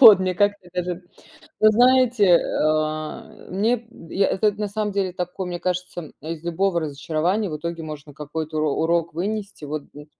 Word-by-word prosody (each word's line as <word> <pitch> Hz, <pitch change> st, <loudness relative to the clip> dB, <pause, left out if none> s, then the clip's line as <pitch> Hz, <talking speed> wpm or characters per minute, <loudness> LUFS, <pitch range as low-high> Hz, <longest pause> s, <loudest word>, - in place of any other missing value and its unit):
Вот. 220 Hz, -7 st, +11 dB
Мне 185 Hz, -1 st, 0 dB
как-то 205 Hz, -1 st, +1 dB
даже 180 Hz, 0 st, -3 dB, 0.6 s
вот 215 Hz, 0 st, +6 dB
знаете, 245 Hz, -1 st, +5 dB
э, -, -, +2 dB, 0.3 s
а, 155 Hz, 0 st, 0 dB, 0.3 s
мне 220 Hz, +6 st, +1 dB
б 225 Hz, -7 st, -14 dB
я 195 Hz, 0 st, +4 dB
этот 210 Hz, +1 st, +1 dB
на 210 Hz, -1 st, -1 dB
самом 210 Hz, 0 st, -2 dB
деле 195 Hz, -2 st, 0 dB
такой, 180 Hz, +1 st, -4 dB
мне 175 Hz, -1 st, -3 dB
кажется, 180 Hz, 0 st, -2 dB
м, 155 Hz, -, -10 dB
а, 155 Hz, -, -8 dB
из 165 Hz, -1 st, -5 dB
любого 175 Hz, +1 st, +1 dB
разочарования 160 Hz, +7 st, -1 dB
в 150 Hz, -, -3 dB
итоге 170 Hz, +1 st, -4 dB
можно 150 Hz, -2 st, -8 dB
какой-то 155 Hz, +2 st, -4 dB
уро 155 Hz, -1 st, +2 dB
урок 170 Hz, 0 st, +1 dB
вынести. 200 Hz, 0 st, -3 dB
Вот 150 Hz, 0 st, -5 dB
д 145 Hz, +1 st, -11 dB
180 Hz, 190 wpm, -23 LUFS, 155-205 Hz, 0.6 s, Вот